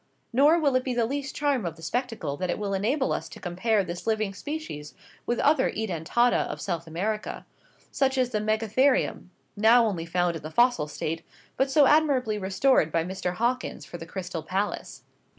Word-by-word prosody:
Nor 290 +7 +5
will 285 -5 +2
it 255 - +2
be 255 -2 -2
the 235 -1 +2
least 275 +3 -4
charm 285 -5 +1
of 170 -3 -4
the 165 - -14
spectacle 230 - -2
that 185 +2 -3
it - - 0
will 205 -1 -3
enable 250 +9 +1
us - - -4
to - - -11
compare 200 +4 0
this 175 +3 -7
living 215 -3 0
species 245 - -6 0.3
with 240 - 0
other 290 -2 +3
Edentata 220 +4 +1
of - - -6
South 170 -3 -3
America 205 +7 -3 0.5
such 270 -1 +1
as 250 -1 +1
the 215 - 0
Megatherium, 220 +2 +1 0.3
now 230 +3 +5
only 175 -6 -2
found 175 0 +1
in 160 - -6
the 155 - -6
fossil 240 -4 +3
state, 160 +2 -4 0.3
but 265 +1 +1
so 285 +1 +5
admirably 265 -8 +3
restored 190 - +2
by 165 +1 +1
Mr 180 0 -3
Hawkins 245 +5 -1
for 175 - -9
the 165 - -8
Crystal 180 -2 -5
Palace. 190 +6 -3
215 Hz, 185 wpm, -26 LUFS, 175-255 Hz, 0.5 s, Nor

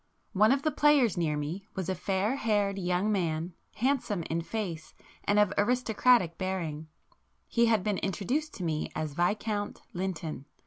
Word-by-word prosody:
One 215 +3 +5
of 275 +1 +2
the 310 - +2
players 290 -9 +4
near 155 -4 0
me 165 +7 -4
was 185 -3 -3
a 190 - 0
fair 195 +6 0
haired 205 -4 +1
young 180 +3 +1
man, 170 -3 -1 0.2
handsome 240 -7 0
in 165 +1 -2
face 170 -4 -5 0.3
and 205 - +2
of 210 -2 +4
aristocratic 235 -5 +3
bearing,—he 175 +5 -3
had 220 -4 +3
been 210 -2 0
introduced 250 - -1
to 185 - -6
me 155 -2 -2
as 155 -2 -3
Viscount 205 +5 -1
Lynton. 175 -6 -4
195 Hz, 150 wpm, -29 LUFS, 170-220 Hz, 0.3 s, One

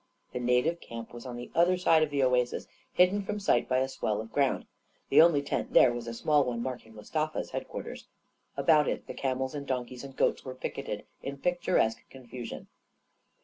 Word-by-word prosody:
The - - -2
native 125 +8 +1
camp 115 0 -8
was 120 +1 -8
on 125 - -6
the 120 0 -8
other 175 +2 +4
side 165 -3 +4
of 155 - +2
the 140 -2 +1
oasis, 125 -1 +1 0.3
hidden 185 +3 +4
from 210 +2 -3
sight 200 - +2
by 130 - +2
a 130 +1 +2
swell 110 -5 -2
of 110 +1 -7
ground. 140 -2 +1 0.4
The - - +7
only 160 -4 +5
tent 140 - -3
there 120 - +7
was 120 -1 -5
a 115 - -4
small 145 +4 +3
one 120 -2 -2
marking 120 -3 -6
Mustafa's 155 +8 -3
headquarters. - - -6 0.5
About 150 -3 +4
it - - -2
the - - -7
camels 130 0 -2
and 140 -1 -6
donkeys 125 -1 -3
and 135 -1 -9
goats - - +1
were 130 -1 -7
picketed - - -5 0.2
in 140 0 -5
picturesque 155 -8 +1
confusion. 125 -2 -8
130 Hz, 190 wpm, -29 LUFS, 120-155 Hz, 0.5 s, The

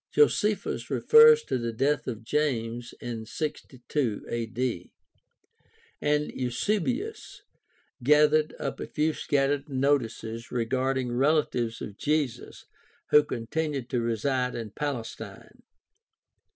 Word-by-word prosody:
Josephus 210 - +2
refers 460 0 +7
to 130 - -2
the 115 0 -2
death 140 +6 0
of 115 -3 -5
James 120 -3 -1
in 115 -2 -5
62 135 -5 -3
a.d., 115 -4 -3 1.1
and 150 0 +1
Eusebius 210 - -2 0.6
gathered 150 +3 +4
up - - -4
a - - -5
few 155 +1 0
scattered 140 0 0
notices 125 -4 -1
regarding 130 +1 0
relatives 125 -3 +1
of 105 0 -8
Jesus 145 -5 -2 0.5
who 150 - +7
con 120 -5 -5
tinued 145 -2 -2
to 125 -3 0
reside 125 +3 -1
in 115 -3 -5
Palestine. 125 -4 -6
130 Hz, 105 wpm, -27 LUFS, 115-150 Hz, 1.1 s, refers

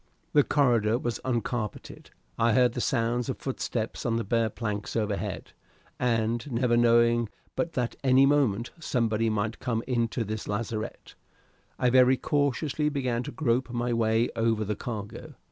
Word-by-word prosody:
The 145 - +6
corridor 120 -7 +2
was 120 -2 -3
uncarpeted; 120 -3 -3 0.3
I 115 0 +2
heard 125 0 +4
the 125 - -3
sounds 120 +1 0
of 130 - -2
footsteps 120 -4 -3
on 115 -2 0
the 115 - 0
bare 115 +1 +1
planks 105 -2 -4
overhead, 105 -3 -2 0.5
and, 115 +2 0
never 120 0 +2
knowing 120 -1 +4 0.3
but 165 - -2
that 125 -2 -1
at - - -22
any 130 0 +5
moment 125 -5 +2
somebody 115 -7 0
might 110 +1 -2
come 115 -2 -2
into 120 -1 0
this 110 0 -5
lazarette, 110 +1 -4 0.6
I 125 - +2
very 130 0 +5
cautiously 145 +2 0
began 130 -5 -1
to 145 - -6
grope 130 -4 0
my 120 0 -1
way 115 0 +2
over 115 -1 +1
the 105 +1 -2
cargo. 105 -3 -7
120 Hz, 155 wpm, -27 LUFS, 115-125 Hz, 0.6 s, The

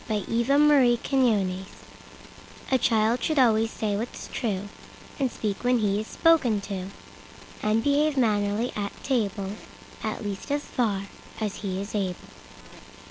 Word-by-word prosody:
Whole 215 -3 0
Duty 235 +5 -1
of 280 -5 +5
Children 200 -8 +2 1.1
A 260 - +5
CHILD 225 0 +2
should 310 - 0
always 225 -3 +4
say 210 -2 -2
what's 225 +4 -5
trueAnd 205 -5 -3 0.6
speak 210 -3 -4
when 250 0 +3
he 205 -2 +1
is 215 - -5
spoken 290 -11 +3
to, 195 -2 -5 0.7
And 215 +1 +1
behave 290 +1 +2
mannerly 210 -1 +1
at 200 -1 -5
table; 205 -7 -1 0.5
At 215 0 -3
least 200 -2 -5
as 290 0 0
far 205 -6 -1 0.4
as 210 -3 -2
he 190 -2 -3
is 200 +2 -6
able. 190 -4 -1
220 Hz, 135 wpm, -26 LUFS, 200-250 Hz, 1.1 s, of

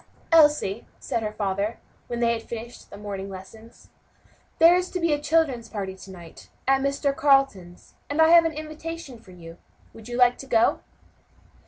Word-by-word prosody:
"Elsie," 295 -10 +3
said 230 - -3
her 215 -1 -3
father, 200 +2 -2 0.3
when 240 0 -4
they 235 0 +3
had 225 - -4
finished 235 +1 -9
the - - -11
morning 200 -1 -6
lessons, 195 +4 -13 0.7
"there 335 +2 +7
is 360 0 -1
to 365 - -4
be 335 -3 +1
a 290 - -2
children's 290 -8 0
party 195 -3 -5
to 190 +1 -13
night, 175 -3 -13 0.2
at 270 0 +3
Mr. 275 0 -1
Carleton's, 270 -13 +1 0.2
and 290 +2 -3
I 320 0 +6
have 335 0 +7
an 325 - 0
invitation 310 -3 -8
for 220 - -20
you. 170 -2 -13 0.3
Would 225 0 -13
you 240 0 -5
like 245 -1 +4
to 270 - -9
go?" 230 -3 +2
240 Hz, 180 wpm, -24 LUFS, 200-295 Hz, 0.7 s, there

